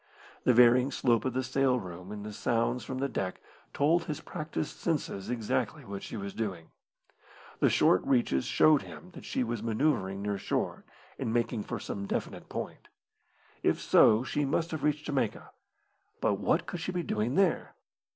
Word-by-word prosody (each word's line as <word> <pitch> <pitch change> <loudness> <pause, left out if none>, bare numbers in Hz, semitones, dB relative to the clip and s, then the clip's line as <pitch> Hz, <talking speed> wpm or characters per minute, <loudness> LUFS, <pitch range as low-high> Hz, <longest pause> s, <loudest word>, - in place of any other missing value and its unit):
The 125 - +6
varying 125 +2 +6
slope 120 -4 +1
of 130 - 0
the 130 +1 0
sail 130 0 +2
room 90 -1 -8
and 105 0 -6
the 105 - -6
sounds 120 +2 0
from 130 +4 -5
the 135 +1 0
deck 95 -8 -3 0.3
told 165 +4 +2
his 150 - -4
practised 155 0 -5
senses 145 - -2
exactly 115 -3 -1
what 100 0 -6
she - - -6
was 100 -1 -5
doing. 95 -7 -4 0.9
The - - +4
short 90 - +4
reaches 120 - +2
showed 155 -2 +5
him 180 - -11
that - - -11
she - - -1
was 120 -2 -3
manoeuvring 110 -5 0
near 100 -1 -1
shore, - - -2 0.3
and 110 - -1
making 115 -2 0
for 120 - -4
some 100 0 -5
definite - - -4
point. - - -6 0.7
If - - +2
so, 110 +3 +5
she 145 +2 -1
must 160 +4 0
have 160 - -3
reached 150 0 0
Jamaica. 135 -7 -2 0.7
But - - +1
what - - +1
could 175 - -5
she 175 - -3
be 180 -1 -2
doing 110 -2 -1
there? 190 -2 +1
120 Hz, 175 wpm, -30 LUFS, 105-145 Hz, 0.9 s, The